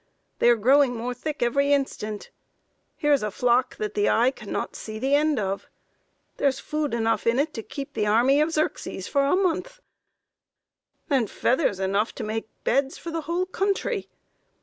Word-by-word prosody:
They 240 - +5
are 240 - +6
growing 255 +3 +4
more 240 +2 -3
thick 295 +3 -3
every 280 +4 +2
instant. 215 -7 -1 0.7
Here 295 -2 +2
is 280 - +3
a 210 - -1
flock 245 +4 +1
that 210 -1 -3
the 205 0 +2
eye 240 +3 +4
cannot 215 -6 -5
see 215 0 -7
the 265 +5 0
end 300 0 +3
of. 195 -2 -2 0.7
There - - +2
is 270 0 0
food 300 -4 -2
enough 225 0 0
in 230 +1 +3
it 300 +3 0
to 225 - -4
keep 275 +5 -7
the 210 -2 0
army 250 +7 +4
of 310 +2 +1
Xerxes 310 -1 -2
for 280 -1 +2
a 280 +5 +3
month 395 +7 -1 1.3
and 265 - +1
feathers 245 - +1
enough 200 +3 0
to - - -5
make 220 +1 -3
beds 270 +2 +1
for 335 - -7
the 330 0 -2
whole 340 +4 -1
country.... 390 +2 -1
265 Hz, 180 wpm, -25 LUFS, 225-300 Hz, 1.3 s, are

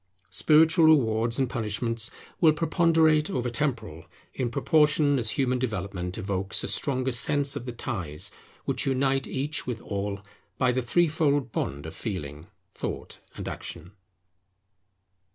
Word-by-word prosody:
Spiritual 160 - +5
rewards 115 -6 +3
and 135 -1 +1
punishments 115 0 -1 0.3
will 160 -3 +6
preponderate 160 -1 +3
over 125 -9 -2
temporal, 120 - -2 0.3
in 125 -2 -2
proportion 150 +1 +3
as 115 -2 -1
human 125 -2 +1
development 95 -6 -3
evokes 100 -2 -1
a - - -3
stronger 130 -2 0
sense 140 +3 +3
of 120 - -6
the - - -3
ties 95 - -4 0.3
which - - 0
unite 135 0 +1
each 145 +4 -2
with 120 -3 -3
all, 100 -1 -4 0.4
by 130 -1 +3
the 130 +1 0
threefold 145 -2 +1
bond 70 -6 -3
of 80 0 -8
Feeling, 75 - -6 0.2
Thought, - - -6 0.2
and - - -6
Action. 85 +2 -6
125 Hz, 135 wpm, -26 LUFS, 105-145 Hz, 0.4 s, will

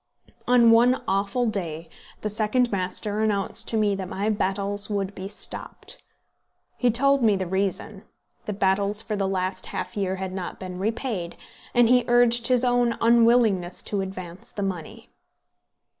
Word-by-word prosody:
On 240 -2 +6
one 240 +3 +4
awful 200 +5 0
day 170 -7 -3 0.3
the 215 - -2
second 225 +4 +1
master 200 +2 -2
announced 215 +1 0
to 225 - -1
me 210 -2 +2
that 190 -2 -5
my 205 +3 -1
battels 200 0 -1
would 200 -1 -2
be 190 0 -7
stopped. 205 - -6 0.7
He 245 - +2
told 275 +4 +3
me 220 -3 +4
the 190 -1 -2
reason, 195 +2 -2 0.4
the 210 - -3
battels 200 +2 +1
for 220 -1 -3
the 195 -1 -1
last 185 0 -2
half - - -5
year 190 -2 -1
had 190 -1 -5
not 185 -2 -6
been 185 -1 -7
repaid; 215 -4 -3 0.4
and 240 -1 +5
he 250 +1 +4
urged 240 -1 +4
his 255 -1 +2
own 245 -1 +2
unwillingness 230 -6 +3
to 200 -2 -2
advance 185 -2 -8
the 205 - -4
money. 180 -5 -6
205 Hz, 160 wpm, -24 LUFS, 190-235 Hz, 0.7 s, On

